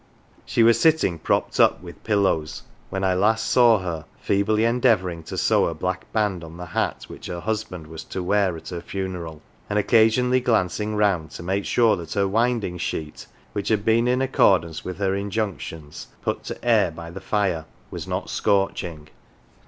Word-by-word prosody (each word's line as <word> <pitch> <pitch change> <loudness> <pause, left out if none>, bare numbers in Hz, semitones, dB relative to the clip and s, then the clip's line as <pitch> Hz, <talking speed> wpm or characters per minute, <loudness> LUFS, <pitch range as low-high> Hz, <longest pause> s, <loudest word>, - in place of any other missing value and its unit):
She 115 - +3
was 115 0 +5
sitting 155 - +3
propped - - 0
up - - +4
with 85 -3 -11
pillows 100 -8 0 0.3
when 95 0 -3
I 95 -1 +3
last 110 +4 +2
saw 120 -3 +5
her, 85 -3 -4
feebly 105 +3 +1
en 120 +2 +1
deavouring 90 -9 +2
to - - -6
sew - - +3
a 85 - -3
black 95 +3 -4
band 105 -5 0
on 80 +1 -10
the 90 - -7
hat - - -2
which - - -9
her 90 -1 -5
hus 110 +3 -2
band 90 -6 -9
was 80 0 -9
to 95 - -5
wear 95 -2 +1
at - - -10
her 85 -2 -5
funeral, 90 -6 -5 0.3
and 105 - 0
occasionally 120 +4 +3
glanc 110 -8 +1
ing 105 0 -2
round 100 -7 +1
to - - -8
make 95 +3 -1
sure 115 -3 +3
that 85 -2 -7
her 100 -1 +1
winding 110 -4 0
sheet, 75 -3 -5 0.3
which 100 -1 -3
had 110 -2 +1
been, 115 +2 +3
in 125 +1 +2
accord 100 -9 +4
ance 80 -1 -8
with 90 -1 -6
her 95 -1 0
injunctions, 100 - -4 0.2
put - - -2
to - - -7
"air" 110 -6 +4
by 85 0 -9
the 95 +2 -8
fire, 95 -5 0 0.3
was - - -6
not - - -3
scorching. 90 -6 -1
95 Hz, 190 wpm, -23 LUFS, 85-110 Hz, 0.3 s, was